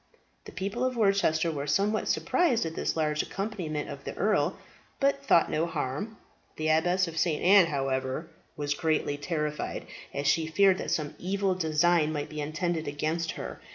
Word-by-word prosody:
The - - -9
people 200 +6 -3
of 255 -1 0
Worcester 195 -6 +2
were 145 -2 -4
somewhat 205 +8 +1
surprised 280 - +2
at 165 - -4
this - - -2
large 150 -1 +1
accompaniment 185 -7 -4
of 140 - -8
the - - -6
earl, 195 -5 +1 0.4
but 275 0 +1
thought 170 -11 +4
no 160 +2 +1
harm. 195 - -3 0.4
The 155 0 -1
Abbess 175 +4 +3
of 165 -1 -4
St. 160 -3 0
Anne's, 185 -2 +6
however, 135 +1 -2 0.3
was 145 -1 -1
greatly 155 -1 0
terrified, 150 0 -3 0.3
as 140 - -3
she 160 +2 +2
feared 190 +3 +4
that - - -4
some 150 -2 -1
evil 195 +1 0
design 165 -1 +2
might 145 -2 -3
be 155 -1 -5
intended 160 +2 -2
against 155 +3 -2
her. - - -7
160 Hz, 170 wpm, -28 LUFS, 150-195 Hz, 0.4 s, Anne's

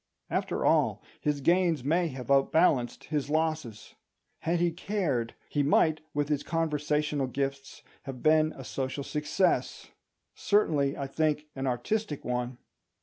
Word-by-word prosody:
After - - -1
all, - - +2 0.2
his 145 -1 -1
gains 170 -2 +2
may 170 +5 +2
have 130 -2 -6
outbalanced 135 -2 +3
his 145 -2 -2
losses. 155 -7 -2 0.5
Had 170 +1 0
he 175 0 +2
cared, 165 - -2
he 145 - 0
might, 155 +2 +3
with 145 0 -1
his 145 -2 0
conversational 150 -3 0
gifts, 135 +1 -4 0.2
have 130 -2 -7
been 155 0 +4
a 135 - -9
social 130 +3 -3
success; 150 +6 0 0.4
certainly, 150 -9 +1
I 140 - -3
think, 150 +2 0
an 135 0 -2
artistic 145 - -2
one. 125 0 -2
150 Hz, 135 wpm, -29 LUFS, 135-160 Hz, 0.5 s, been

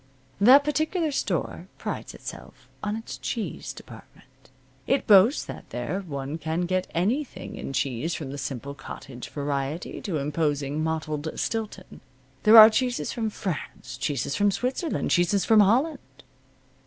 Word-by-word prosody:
That 255 +8 +8
particular 310 +2 0
store 280 - -2
prides - - -5
itself - - -10
on 210 0 -2
its 225 +1 -7
cheese 230 -3 -4
department. - - -15 0.4
It 275 - +1
boasts 210 +6 +6
that - - -9
there 125 +10 -3
one 145 -3 -5
can 160 +2 -2
get 185 +1 0
anything 240 - -1
in - - -6
cheese 135 +4 -1
from 140 -4 -6
the 140 - -6
simple 140 +1 -5
cottage 135 -3 -9
variety 145 +2 -3
to 180 -6 -2
imposing 145 0 -1
mottled 160 -1 -2
Stilton. 215 -4 -4 0.4
There 215 +7 +7
are 220 0 +12
cheeses 250 +2 0
from 225 -3 -2
France, 160 -9 -5
cheeses 135 +1 -2
from 205 0 +3
Switzerland, 250 - -2
cheeses 175 +3 +2
from 220 -2 +5
Holland. 260 +9 +3
180 Hz, 140 wpm, -26 LUFS, 145-225 Hz, 0.4 s, are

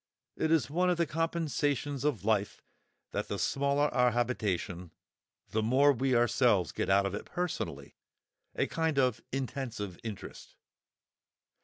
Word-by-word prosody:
It 160 - 0
is 165 -3 +3
one 180 +5 +1
of 180 - +2
the 170 - +2
compensations 145 -4 -1
of 125 - -1
life 105 -2 0 0.5
that - - -2
the - - -3
smaller 140 +1 +1
our 125 -1 +4
habitation, 105 -7 -2 0.6
the 110 - 0
more 135 +6 +4
we 130 +1 +1
ourselves 120 -5 +3
get - - -2
out 100 +1 +4
of 100 - -2
it 105 - -4
personally—a 180 -1 -5
kind 160 -3 -1
of 125 -4 +2
"intensive" 125 -8 -4
interest. 105 -4 -8
130 Hz, 135 wpm, -31 LUFS, 110-145 Hz, 0.6 s, our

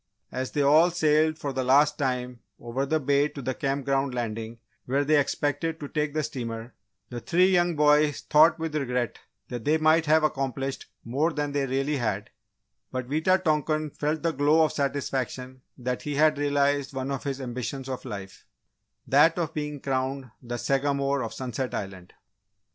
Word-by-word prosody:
As 130 0 -3
they 145 - +1
all 155 +5 +6
sailed 155 -2 +2
for 140 -3 -4
the 130 0 -1
last 145 +4 +4
time 125 -3 -2 0.2
over 130 +4 -3
the 155 +2 +1
bay 140 +1 +2
to 150 - -10
the 130 0 -2
Camp 135 +1 -2
Ground 135 -1 0
landing 115 -1 -4 0.3
where 140 +3 0
they 155 +1 +4
expected 145 +3 -1
to 145 - -6
take 150 0 -2
the 155 - +1
steamer, 115 -4 -5 0.4
the 120 - -4
three 185 +5 +3
younger 175 -3 +2
boys 150 0 +4
thought 155 +2 +5
with 160 -2 -4
regret 125 -5 -1 0.3
that 120 -2 -5
they 155 +5 +3
might 160 0 +3
have 155 +1 +4
accomplished 135 -2 -2 0.2
more 140 +8 0
than 145 -1 -2
they 140 -1 0
really 135 +3 0
had, 110 -4 -2 0.6
but 130 -1 -4
Wita 185 +6 +2
tonkan 155 -1 0
felt 150 +2 -2
the 165 - +2
glow 150 +2 +3
of - - -2
satisfaction 130 -2 -3 0.2
that 125 0 -3
he 145 -1 -4
had 155 0 +3
realised 145 -1 +1
one 135 +1 -3
of 135 - -3
his 135 -1 -3
ambitions 130 +1 -5
of 130 -1 -5
life 100 -6 -8 0.6
that 150 +5 +4
of 165 -2 -2
being 150 -1 -4
crowned 130 -1 -2
the 120 0 -5
Sagamore 140 +1 0
of 115 - -4
Sunset 125 +2 -4
Island. 95 -3 -7
140 Hz, 175 wpm, -26 LUFS, 130-150 Hz, 0.6 s, all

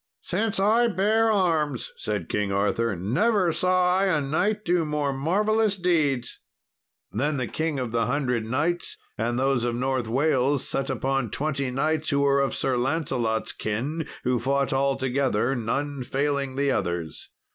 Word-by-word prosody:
"Since 210 +3 0
I 225 +5 +4
bare 220 +2 +2
arms," 160 - 0
said 105 -6 -3
King 105 -1 -1
Arthur, 105 +2 0
"never 180 - +1
saw 180 +2 +2
I 195 - +2
a 175 -6 +2
knight 185 +10 0
do 175 -1 +2
more 150 -2 -1
marvellous 205 +8 +1
deeds." 150 -9 0 0.7
Then 145 +7 -1
the 130 - -1
King 155 +3 -2
of 125 -3 -3
the 115 -1 +1
Hundred 125 -3 0
Knights 150 +10 -1 0.2
and 120 +2 -1
those 135 -2 +1
of 120 -1 -1
North 130 -1 -1
Wales, 135 +2 +1
set 135 0 -2
upon 135 -3 -1
twenty 140 +1 -2
knights 155 +5 0
who 140 -2 +2
were 140 0 +3
of 135 - 0
Sir 130 -2 0
Lancelot's 125 -5 0
kin, 140 +10 -3 0.2
who 125 -1 +1
fought 135 +2 0
all 135 0 +2
together, 130 -2 0
none 140 +4 -2
failing 140 +1 -1
the 140 0 +1
others. 85 -7 -3
140 Hz, 155 wpm, -25 LUFS, 125-165 Hz, 0.7 s, I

